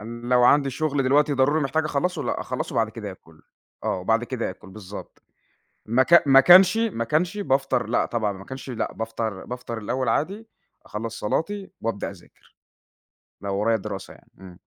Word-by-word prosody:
أنا 120 Hz, +2 st, -8 dB
لو 125 Hz, 0 st, +5 dB
عندي 140 Hz, +1 st, +4 dB
شُغل 145 Hz, 0 st, -1 dB
دلوقتي 145 Hz, +3 st, +3 dB
ضروري 145 Hz, +4 st, +2 dB
محتاج 155 Hz, +3 st, 0 dB
أخلّصُه 155 Hz, +2 st, -1 dB
لأ، 120 Hz, -, -2 dB
أخلّصُه -, -, -4 dB
وبعد 110 Hz, -1 st, +1 dB
كده 105 Hz, -3 st, -7 dB
آكُل، 80 Hz, -4 st, -16 dB, 0.4 s
آه، -, -, 0 dB
وبعد 115 Hz, +5 st, +1 dB
كده 120 Hz, -4 st, -3 dB
آكُل 95 Hz, 0 st, -13 dB
بالضبط، 100 Hz, -1 st, -10 dB, 0.6 s
ما 120 Hz, +4 st, +3 dB
كا 170 Hz, +3 st, +7 dB
ما 135 Hz, -1 st, +7 dB
كانش 185 Hz, +6 st, +7 dB
ما 220 Hz, -, 0 dB
كانش 175 Hz, -, 0 dB
بافطر 135 Hz, -, 0 dB
لأ، 120 Hz, -, +1 dB
طبعًا 110 Hz, -4 st, -1 dB
لو 95 Hz, -, -11 dB
ما 95 Hz, -, -11 dB
كانش 130 Hz, 0 st, -8 dB
لأ، 120 Hz, -, -3 dB
بافطر 110 Hz, -3 st, -4 dB
بافطر 125 Hz, -2 st, -6 dB
الأول 120 Hz, +3 st, -2 dB
عادي، 200 Hz, -, -1 dB, 0.4 s
أخلّص 110 Hz, +1 st, -6 dB
صلاتي 195 Hz, -, -2 dB
وأبدأ 115 Hz, -3 st, -2 dB
أذاكر، 90 Hz, -3 st, -19 dB, 0.9 s
لو 100 Hz, -1 st, -3 dB
ورايا 110 Hz, +2 st, +2 dB
دراسة 100 Hz, -1 st, -7 dB
يعني. -, -, -22 dB
إمم. 95 Hz, -2 st, -12 dB
120 Hz, 180 wpm, -24 LUFS, 110-150 Hz, 0.9 s, كا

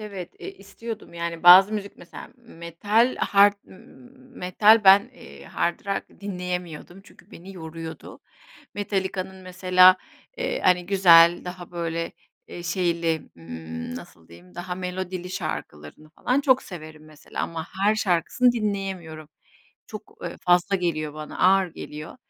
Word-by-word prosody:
evet, 200 Hz, -5 st, -8 dB
eee, -, -, -7 dB
istiyordum. 205 Hz, 0 st, -9 dB
Yani, 170 Hz, 0 st, -5 dB
bazı 185 Hz, +4 st, +9 dB
müzik 205 Hz, -2 st, -5 dB
mesela; 175 Hz, -, -12 dB
metal 215 Hz, +2 st, -1 dB
hard 200 Hz, 0 st, +4 dB, 0.8 s
metal 210 Hz, +4 st, +4 dB
ben, 200 Hz, +5 st, +6 dB
eee, -, -, -14 dB
hard 170 Hz, -, -2 dB
rock 195 Hz, 0 st, -5 dB
dinleyemiyordum. 180 Hz, -2 st, -6 dB
Çünkü -, -, -20 dB
beni 190 Hz, +3 st, -12 dB
yoruyordu. 160 Hz, -1 st, -9 dB, 0.5 s
Metallica'nın 190 Hz, -2 st, -3 dB
mesela, 185 Hz, 0 st, +4 dB, 0.4 s
eee, -, -, -2 dB
hani 180 Hz, -1 st, +2 dB
güzel 175 Hz, -3 st, +6 dB
daha 180 Hz, -1 st, -8 dB
böyle, 165 Hz, -1 st, -4 dB, 0.4 s
eee, 175 Hz, -, -9 dB
şeyli, 170 Hz, -2 st, -1 dB, 0.2 s
ımm, 80 Hz, 0 st, -8 dB
nasıl 85 Hz, -1 st, -12 dB
diyeyim, 85 Hz, +2 st, -17 dB
daha 180 Hz, 0 st, -5 dB
melodili 180 Hz, 0 st, -5 dB
şarkılarını 75 Hz, -, -7 dB
falan 250 Hz, -, -1 dB
çok 265 Hz, -2 st, +3 dB
severim 155 Hz, -4 st, -11 dB
mesela. 155 Hz, -1 st, -8 dB
Ama 165 Hz, 0 st, -5 dB, 0.2 s
her 210 Hz, +1 st, +4 dB
şarkısını 215 Hz, +5 st, +1 dB
dinleyemiyorum. 195 Hz, -8 st, -4 dB, 0.6 s
Çok, -, -, -11 dB
ııı, -, -, -6 dB
fazla 180 Hz, +3 st, +2 dB
geliyor 155 Hz, -4 st, -3 dB
bana, 155 Hz, 0 st, -8 dB
ağır 190 Hz, 0 st, +4 dB
geliyor. 150 Hz, +8 st, -9 dB
180 Hz, 130 wpm, -24 LUFS, 165-195 Hz, 0.8 s, bazı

